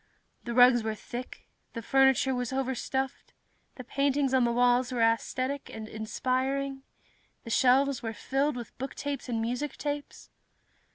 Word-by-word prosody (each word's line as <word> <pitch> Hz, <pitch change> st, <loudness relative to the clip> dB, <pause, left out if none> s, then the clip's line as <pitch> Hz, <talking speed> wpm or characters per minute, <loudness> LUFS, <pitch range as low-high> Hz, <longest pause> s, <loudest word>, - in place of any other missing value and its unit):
The 235 Hz, -1 st, -4 dB
rugs 245 Hz, -1 st, +7 dB
were 220 Hz, 0 st, -2 dB
thick, 245 Hz, +4 st, -8 dB, 0.3 s
the 230 Hz, -, -6 dB
furniture 265 Hz, +1 st, +3 dB
was 250 Hz, -1 st, -2 dB
overstuffed, 265 Hz, 0 st, -3 dB, 0.4 s
the 255 Hz, -, -8 dB
paintings 275 Hz, +1 st, 0 dB
on 255 Hz, -2 st, +4 dB
the 235 Hz, -, +1 dB
walls 245 Hz, +1 st, +3 dB
were 250 Hz, -, -2 dB
aesthetic 255 Hz, +4 st, 0 dB
and 220 Hz, -1 st, -7 dB
inspiring, 260 Hz, +5 st, -2 dB, 0.6 s
the 230 Hz, -, -7 dB
shelves 265 Hz, +3 st, +3 dB
were 225 Hz, -2 st, -3 dB
filled 270 Hz, +6 st, -1 dB
with 240 Hz, -2 st, -8 dB
booktapes 275 Hz, 0 st, -4 dB
and 230 Hz, -2 st, -1 dB
musictapes. 285 Hz, +5 st, -4 dB
255 Hz, 135 wpm, -29 LUFS, 240-270 Hz, 0.6 s, rugs